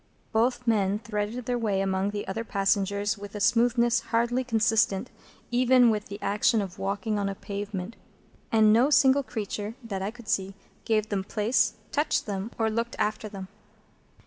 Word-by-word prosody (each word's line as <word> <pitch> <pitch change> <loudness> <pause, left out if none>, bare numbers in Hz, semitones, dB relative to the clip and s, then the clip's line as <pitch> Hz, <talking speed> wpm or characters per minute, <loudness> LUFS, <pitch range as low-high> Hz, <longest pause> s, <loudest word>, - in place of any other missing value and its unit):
Both 245 +2 +1
men 205 -3 +2
threaded 215 +2 -4
their 245 0 -1
way 205 -4 0
among 195 0 0
the 205 0 -5
other 225 +4 -3
passengers 200 0 0
with 205 0 -9
a - - -3
smoothness 235 +2 +3
hardly 235 +2 0
consistent 225 -2 +1 0.4
even 250 -1 +5
with 210 -1 -2
the 200 - -7
action 210 +3 +2
of 195 -1 -5
walking 200 +2 -1
on 200 -1 -1
a 195 - -4
pavement; 200 +1 -5 0.6
and 215 -1 +5
no 245 +5 +4
single 275 -1 +5
creature, 215 -3 -5
that 200 -4 -4
I 195 - -1
could 240 0 -13
see, 195 0 -1 0.3
gave 215 -1 +1
them 195 -2 -1
place, 220 +2 +1 0.2
touched 295 +1 0
them, 200 0 -4
or 225 -1 +1
looked 230 +2 -2
after 215 0 -1
them. 195 -2 -8
215 Hz, 170 wpm, -27 LUFS, 200-235 Hz, 0.6 s, even